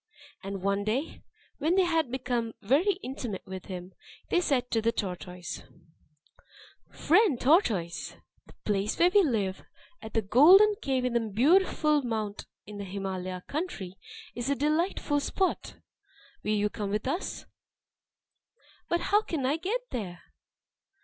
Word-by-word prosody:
And 195 -1 -6
one 200 +1 +1
day, 240 +9 -2 0.4
when 315 +5 +2
they 380 - +5
had 330 -6 +1
become 245 -3 -2
very 295 - +3
intimate 245 -7 -5
with 190 -1 -7
him, 185 -1 -7 0.4
they 355 - +3
said 255 -7 0
to 225 - +2
the 230 +1 +2
tortoise: 180 -4 -5 1.3
"Friend 345 - +3
tortoise! 210 - +1 0.3
the - - -16
place 205 0 0
where 350 +1 +5
we 410 - +7
live, 210 - 0 0.4
at 220 +1 -10
the 225 - +2
Golden 355 - +7
Cave 260 -2 0
on 250 - 0
Mount 225 -4 -1
Beautiful 280 - +2 0.3
in 210 0 -9
the - - -4
Himalaya 185 -2 -4
country, 280 - -4 0.4
is 240 +2 -3
a 280 - +2
delightful 300 +1 0
spot. 375 +6 -1 0.7
Will 210 0 0
you 205 0 +1
come 205 -2 -4
there - - -3
with 215 +4 -1
us?" 335 +8 -3 1.4
"But 345 0 +1
how 415 +2 +3
can 320 -10 -3
I 285 +4 +1
get 405 +9 -2
there?" 185 -7 -5
240 Hz, 145 wpm, -28 LUFS, 200-315 Hz, 1.4 s, we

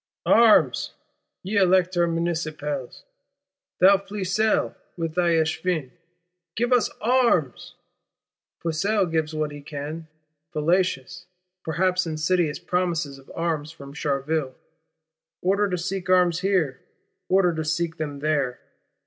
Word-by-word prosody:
Arms, 230 -2 +4 0.5
ye 200 +3 -2
Elector 185 -2 +3
Municipals; 155 -5 -3 0.7
thou 195 +2 +6
Flesselles 200 +2 0 0.2
with 165 -2 -3
thy 175 0 +2
Echevins, 160 -3 0 0.6
give 240 +2 +1
us 245 -3 +3
arms! 235 - +1 0.9
Flesselles 180 +3 0
gives 160 -1 -1
what 155 -1 -1
he 145 0 -9
can: 150 +2 -6 0.5
fallacious, 175 +1 0 0.4
perhaps 180 +2 0
insidious 160 0 0
promises 170 -6 -2
of 135 - -16
arms 160 -3 -2
from 140 -3 -11
Charleville; 145 -1 -2 0.9
order 200 +2 +2
to 180 - -1
seek 185 +1 -4
arms 180 -2 +4
here, 185 -8 0 0.5
order 185 -2 +3
to 160 -1 -3
seek 165 +1 -1
them 145 -3 -5
there. 145 -5 0
170 Hz, 110 wpm, -24 LUFS, 155-185 Hz, 0.9 s, thou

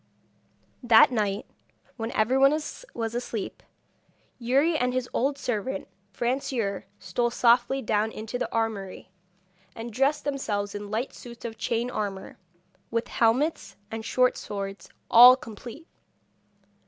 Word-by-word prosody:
That 235 -1 +6
night, 205 -4 -1 0.5
when 225 -1 -4
everyone 260 +5 +4
was 305 - -4 0.3
asleep, 235 -3 -4 0.8
Youri 275 +7 +2
and 250 -4 +1
his 255 -1 -1
old 275 +3 0
servant 240 -5 -3 0.2
Francoeur, 240 -5 -2
stole 240 +2 -1
softly 240 +3 +3
down 215 0 +1
into 220 +3 -5
the - - -3
armoury, 210 -5 -3 0.6
and 225 0 -7
dressed 270 +5 +1
themselves 210 -8 -2
in 205 0 -6
light 225 +5 -2
suits 235 -1 -11
of 225 -1 -5
chain 235 +1 -1
armour, 200 -4 -5 0.5
with 230 0 -2
helmets 255 +8 +1 0.2
and 225 0 -5
short 250 +2 +2
swords, 195 -1 -6 0.2
all 245 +2 +10
complete. 245 - -10
235 Hz, 120 wpm, -26 LUFS, 215-255 Hz, 0.8 s, all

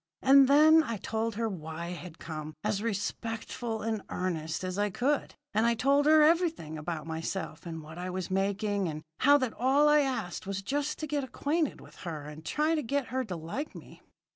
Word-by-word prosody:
"And 270 0 +7
then 310 +3 +7
I 230 -8 -3
told 220 +3 -2
her 225 +1 0
why 160 -4 -6
I 170 - -4
had 175 -2 -8
come, 155 -1 -7
as 210 -1 0
respectful 225 +1 -3
and 220 -2 -1
earnest 160 -3 -2
as 185 +1 -3
I 205 0 +2
could. 265 +7 0 0.2
And 220 +3 +3
I 235 - +3
told 280 +5 +3
her 310 0 +7
everything 325 - +2
about 155 0 -4
myself, 160 +1 -4
and 165 -2 -6
what 160 +3 -10
I 180 +1 -4
was 185 0 -4
making, 200 +1 0
and 155 -1 -5 0.2
how 285 +2 +6
that 255 -5 -1
all 270 +4 +3
I 300 0 +6
asked 255 -11 -2
was 195 0 -3
just 290 +6 -1
to - - -1
get 290 -1 -1
acquainted 295 +3 -1
with - - -15
her 160 -4 -6
and 150 +1 -9
try 300 - +1
to 315 - +1
get 280 0 -1
her 260 +2 -1
to 185 -5 -5
like 170 - -5
me. - - -12
215 Hz, 205 wpm, -30 LUFS, 175-280 Hz, 0.2 s, And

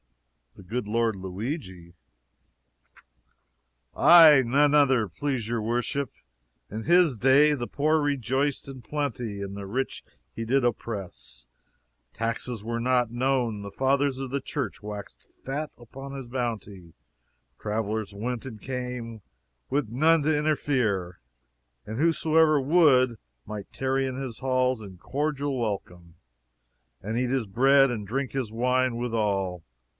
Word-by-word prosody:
"The - - -13
good 110 +4 -4
Lord 115 0 +1
Luigi?" 95 - -6 2.0
"Aye, 160 -6 +8
none 145 +4 +3
other, 135 -7 +4
please 130 - -3
your 115 -1 -1
worship. 120 +5 -1 0.6
In 110 +2 -5
his 170 -4 +4
day, 135 +6 +5
the 120 -4 -3
poor 155 +2 +1
rejoiced 140 0 -1
in 135 -2 -9
plenty 120 -7 -3
and 100 0 -5
the 100 -1 -6
rich 130 +7 -3 0.3
he 115 - -4
did 130 +3 +2
oppress; 100 - -4 0.7
taxes 115 0 -3
were 115 0 -2
not 125 -1 +2
known, 120 -3 0
the 100 0 -7
fathers 135 +1 +1
of 135 -2 -5
the 140 0 -1
church 135 -5 -4
waxed 105 -1 -8 0.2
fat 145 +3 -3
upon 135 +3 -10
his 135 -3 -7
bounty; 110 -8 -5 0.6
travelers 110 0 -2
went 120 +4 -4
and 115 -5 -8
came, 125 -3 -5 0.5
with 140 -2 0
none 155 +7 +3
to 155 +1 +2
interfere; 125 - 0 0.6
and 110 +1 -6
whosoever 160 0 +3
would, 135 -5 +4 0.3
might 105 -2 -7
tarry 135 0 0
in 130 -1 -3
his 130 -4 -5
halls 130 -2 +1
in 95 -3 -10
cordial 145 - -2
welcome, 90 -7 -4 0.9
and 110 +3 -3
eat 125 0 0
his 130 -3 0
bread 135 +6 +4
and 105 -4 -4
drink 130 +4 -2
his 130 -5 -3
wine, 125 +1 +1
withal. 100 -7 -1
125 Hz, 130 wpm, -26 LUFS, 110-135 Hz, 2.0 s, Aye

